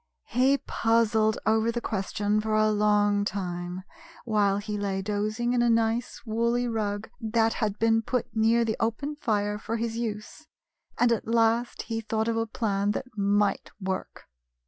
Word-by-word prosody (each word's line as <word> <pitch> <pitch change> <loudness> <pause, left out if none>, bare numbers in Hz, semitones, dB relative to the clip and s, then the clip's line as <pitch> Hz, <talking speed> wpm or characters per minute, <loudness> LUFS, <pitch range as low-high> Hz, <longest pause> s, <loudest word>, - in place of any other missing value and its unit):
He 265 +3 +3
puzzled 225 -3 +1
over 220 +1 +2
the 240 - -2
question 210 -1 -1
for 215 0 -1
a 215 0 +3
long 205 -1 +3
time, 180 -2 -4 0.4
while 205 -3 +2
he 210 +1 -4
lay 195 -2 -2
dozing 215 +4 -1
in 245 - +2
a 240 - +3
nice 230 +1 0
woolly 235 +2 0
rug 215 -2 -2
that 225 -1 +1
had 210 -2 0
been 225 0 +3
put 245 +1 -1
near 225 +1 +3
the 220 -1 -1
open 230 +7 -1
fire 210 -6 -1
for 225 +2 -3
his 230 0 -3
use, 225 +7 -5 0.5
and 245 -1 +3
at 230 - -1
last 230 +1 +1
he 225 -1 -3
thought 220 0 -1
of 230 - 0
a 225 0 0
plan 205 -2 0
that 255 -2 -6
might 205 0 +1
work. 190 -1 -4
220 Hz, 165 wpm, -27 LUFS, 205-230 Hz, 0.5 s, He